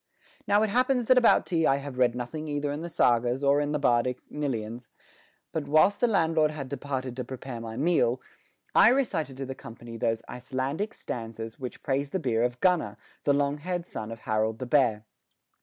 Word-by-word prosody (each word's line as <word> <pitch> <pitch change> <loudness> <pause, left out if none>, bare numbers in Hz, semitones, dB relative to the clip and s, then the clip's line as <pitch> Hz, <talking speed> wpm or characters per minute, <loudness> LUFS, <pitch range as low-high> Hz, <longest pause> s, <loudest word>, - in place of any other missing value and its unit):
Now 205 +1 +4
it 215 - 0
happens 250 +1 +2
that 255 +2 +5
about 235 - +4
tea 165 -4 +1
I 135 - +4
have 140 -2 -6
read 125 -1 +3
nothing 155 +6 -5
either 145 -1 -1
in 145 +2 -4
the 170 - -5
sagas 120 -2 +2
or 140 +1 +4
in 145 0 -1
the 150 - +1
bardic 125 -2 +2
cnylynions, 120 -5 -3 0.6
but, 150 -3 -3
whilst 155 +7 +4
the 245 - +3
landlord 165 -7 +3
had 145 -4 -6
departed 130 -2 -4
to 125 - -3
prepare 125 -1 -7
my 115 0 -6
meal, 130 -5 +2 0.5
I - - +7
recited 185 - 0
to 135 - -4
the 135 - -5
company 115 -2 -10
those 115 0 -1
Icelandic 135 - -3
stanzas 115 -1 -6
which 125 -2 -7
praise 140 +1 0
the 190 - -2
beer 120 -7 0
of 120 +1 0
Gunnar, 170 - +2 0.3
the 145 - +4
long 140 +1 +1
haired 175 +2 -3
son 110 -9 -6
of 115 0 -8
Harold 110 0 0
the 130 - -5
Bear. 120 -6 +2
135 Hz, 195 wpm, -27 LUFS, 120-155 Hz, 0.6 s, I